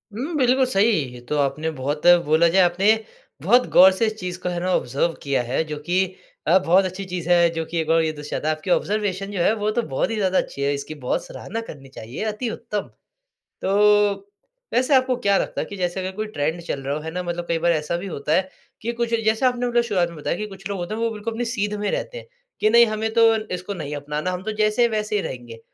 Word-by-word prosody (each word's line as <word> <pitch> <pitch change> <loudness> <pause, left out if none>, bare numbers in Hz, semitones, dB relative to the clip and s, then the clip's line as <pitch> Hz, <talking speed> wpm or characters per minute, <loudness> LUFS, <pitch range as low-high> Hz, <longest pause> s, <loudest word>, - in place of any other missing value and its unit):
हुँ, 275 +10 -4
बिल्कुल 260 0 +3
सही। 220 -3 +3 0.2
ये 125 - -10
तो 150 - -1
आपने 150 +3 0
बहुत 145 +2 -4 0.2
बोला 160 +3 +4
जाए 190 +2 +4
आपने 180 +3 +1 0.5
बहुत 240 - +4
गौर 190 +1 +8
से 190 +4 0
इस 215 - -2
चीज़ 180 0 -5
को 180 - -1
है 175 - -2
ना, 185 +1 -1
ऑब्ज़र्व 140 +7 0
किया 140 -3 +1
है 125 +6 -1
जो 150 -1 -5
कि 185 +3 +2 0.4
अ, 170 +4 +6
बहुत 185 +3 +4
अच्छी 185 +1 -4
चीज़ 180 -2 -5
है 175 -1 +5
जो 165 - -1
कि 170 - -5
एक 155 - -5
बार 165 0 +4
ये 160 -1 0
दर्शाता 150 0 -5
है 155 - +1
आपकी 155 +4 -8
ऑब्जर्वेशन 200 0 0
जो 190 - -2
है 205 - +3
वो 210 0 -1
तो 240 - 0
बहुत 135 - 0
ही 225 - -2
ज़्यादा 190 -3 +1
अच्छी 140 - -2
है, 140 +1 +1
इसकी 140 +2 -5
बहुत 125 - -1
सराहना 225 +4 -6
करनी 135 -2 -11
चाहिए, 125 - -7
अति 220 +2 -2
उत्तम। 210 -3 -4 0.7
तो 190 - -1 1.0
वैसे 255 +3 +3
आपको 255 -1 +3
क्या 200 -5 +2
लगता - - -2
है - - -3
कि 200 - -8
जैसे 180 0 -2
अगर 185 0 -3
कोई 215 +1 -3
ट्रेंड 160 -3 -2
चल 140 -4 -4
रहा 140 +2 -2
हो, 155 - -3
है 160 +1 -6
ना। 180 +1 -3
मतलब 175 0 -4
कई 170 - +1
बार 170 +1 +2
ऐसा 155 +1 -1
भी 185 +3 -6
होता 150 -3 -2
है 185 +2 +1 0.3
कि 235 +1 -2
कुछ 235 0 -2
जैसे 220 +4 +2
आपने 245 -1 +1
मतलब 240 0 +2
शुरुआत 190 -7 0
में 170 - -11
बताया 150 - -2
कि 215 - -4
कुछ 195 -1 -9
लोग 200 - -3
होते 175 +4 -4
है 220 - -4
वो 230 - +1
बिल्कुल 220 +1 -5
अपनी 240 +2 -2
सीध 210 -3 -1
में 205 0 -1
रहते - - -3
हैं - - -10 0.3
कि 215 - +3
नहीं 235 +1 +7
हमें 220 0 -2
तो 230 0 +6 0.3
इसको 185 +3 -6
नहीं 150 -5 -5
अपनाना, 150 +4 -3
हम 180 0 -5
तो 220 - -3
जैसे 215 +3 +2
है 235 - +6
वैसे 215 -1 -2
ही 205 - +1
रहेंगे। 120 -6 -7
185 Hz, 255 wpm, -22 LUFS, 160-215 Hz, 1.0 s, गौर